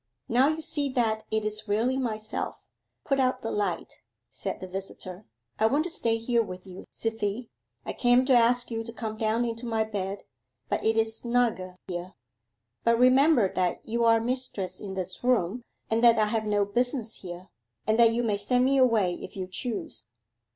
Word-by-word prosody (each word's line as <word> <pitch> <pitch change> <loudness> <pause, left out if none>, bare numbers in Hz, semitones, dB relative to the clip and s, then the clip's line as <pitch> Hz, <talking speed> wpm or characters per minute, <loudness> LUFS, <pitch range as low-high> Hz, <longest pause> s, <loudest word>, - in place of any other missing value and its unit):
'Now 250 +4 +4
you 315 +1 -1
see 290 -3 -1
that 220 -3 0
it 220 -1 -1
is 215 +1 -2
really 225 +5 +1
myself; 220 -4 -3 0.4
put 275 -2 +1
out 255 -1 +1
the 225 - -2
light,' 205 -1 -2 0.3
said - - -5
the - - -6
visitor. 185 -3 -7 0.3
'I 220 - +5
want 285 +6 +2
to 350 - -5
stay 230 -8 0
here 235 +1 +1
with 185 -4 -7
you, 185 -1 -10
Cythie. 225 +1 -3 0.4
I - - -3
came 245 +1 +4
to 265 - +4
ask 240 0 +4
you 225 0 -2
to 230 - -8
come 220 -1 -5
down 220 +2 +1
into 230 +1 -4
my 225 -1 +1
bed, 200 -2 -4 0.5
but - - -1
it 220 0 +2
is 220 0 +2
snugger 230 -6 0
here. 180 0 -5 0.7
But 230 0 +4
remember 255 - +5
that 180 -1 -1
you 235 +1 0
are 230 -1 +5
mistress 225 -6 -3
in 195 -2 -6
this 185 +2 -4
room, 245 -3 +1 0.3
and 225 +1 0
that 235 -1 +7
I 215 - +4
have 215 +1 -1
no 205 -1 +2
business 240 +2 -1
here, 180 0 -9 0.4
and 220 +2 +2
that 230 -1 +7
you 235 +1 0
may 210 -3 +1
send 245 +5 +2
me 275 +1 +3
away 220 -8 +3
if - - -9
you 185 - -2
choose. 185 - -5
225 Hz, 190 wpm, -27 LUFS, 205-245 Hz, 0.7 s, that